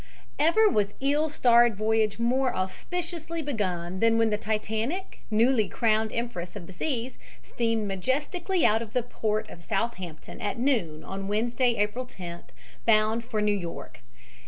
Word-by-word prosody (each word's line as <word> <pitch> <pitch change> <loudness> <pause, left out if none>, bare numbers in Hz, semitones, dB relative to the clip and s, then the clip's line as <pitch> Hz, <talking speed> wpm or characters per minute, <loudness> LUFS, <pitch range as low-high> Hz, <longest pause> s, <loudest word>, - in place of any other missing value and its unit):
EVER 340 +9 +5
was 205 - +1
ill 290 +3 +2
starred 240 -5 +5
voyage 215 0 +1
more 250 +2 +1
auspiciously 330 - -4
begun 190 - -2
than 225 +1 +4
when 225 -1 +3
the - - +3
Titanic, 220 - -2
newly 220 -1 +3
crowned 220 -1 +1
empress 215 -7 -4
of 195 -4 -7
the 190 - -11
seas, 255 - -3 0.2
steamed 225 -3 -1
majestically 295 - 0
out 220 +2 +4
of 220 -2 -7
the 250 - +1
port 215 -2 -2
of 170 - -11
Southampton 190 -5 -4
at 205 +1 -2
noon 225 - 0
on 195 0 -5
Wednesday, 235 +4 +1
April 220 +4 -1
10th, 175 -6 -8 0.4
bound 220 +1 +3
for 220 -3 -2
New 210 0 +3
York. 175 -4 -6
225 Hz, 150 wpm, -27 LUFS, 205-255 Hz, 0.4 s, EVER